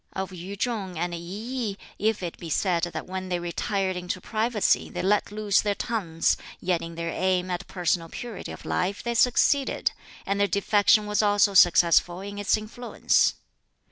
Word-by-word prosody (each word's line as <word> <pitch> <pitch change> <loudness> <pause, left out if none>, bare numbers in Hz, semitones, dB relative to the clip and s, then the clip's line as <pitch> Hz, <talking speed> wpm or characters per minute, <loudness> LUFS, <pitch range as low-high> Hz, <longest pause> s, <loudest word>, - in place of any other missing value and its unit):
"Of 190 0 -4
Yu 185 +3 -7
chung 200 -5 -3
and 175 +1 -2
I - - -3
yih, 210 +5 -4 0.2
if 215 -1 0
it 170 - -5
be 170 - -7
said 175 +1 +1
that 175 - -6
when 185 0 -5
they 180 - 0
retired 185 +2 -2
into 180 0 -4
privacy 220 +2 +1
they - - -4
let 205 +2 +1
loose 210 -1 +2
their 205 -1 0
tongues, 190 -10 0 0.2
yet 175 -2 0
in 165 0 -7
their 165 0 -3
aim 185 0 0
at 175 - -4
personal 175 -2 -1
purity 235 0 -7
of - - -10
life 190 +3 -1
they 235 - -1
succeeded, 255 +3 +2 0.3
and 200 0 -1
their 200 - +3
defection 205 +1 +3
was 210 +1 +1
also 205 -1 +3
successful 175 -1 +5
in 200 +1 -7
its 205 +1 +2
influence. 220 +3 +1
195 Hz, 175 wpm, -26 LUFS, 175-210 Hz, 0.3 s, successful